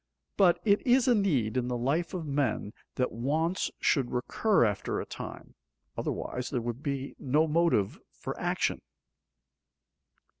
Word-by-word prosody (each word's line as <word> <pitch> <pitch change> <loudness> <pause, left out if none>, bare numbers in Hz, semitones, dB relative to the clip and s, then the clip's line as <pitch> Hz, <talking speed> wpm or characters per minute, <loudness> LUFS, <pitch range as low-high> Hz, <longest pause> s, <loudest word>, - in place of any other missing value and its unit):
But 180 -3 +4
it 205 -1 +4
is 255 +1 +3
a 250 - +6
need 140 - +1
in 125 -1 0
the 125 -1 -1
life 150 +9 0
of 170 -3 -4
men 140 -7 -1 0.2
that 125 - 0
wants 155 +10 0
should 130 -4 +2
recur 210 - +2
after 105 -3 -1
a - - -4
time, - - -8 0.4
otherwise 125 0 -3
there 125 - -1
would 120 +2 -4
be 140 -2 -3
no 150 +4 +2
motive 160 - +2
for - - -6
action. - - 0
140 Hz, 145 wpm, -29 LUFS, 125-175 Hz, 0.4 s, a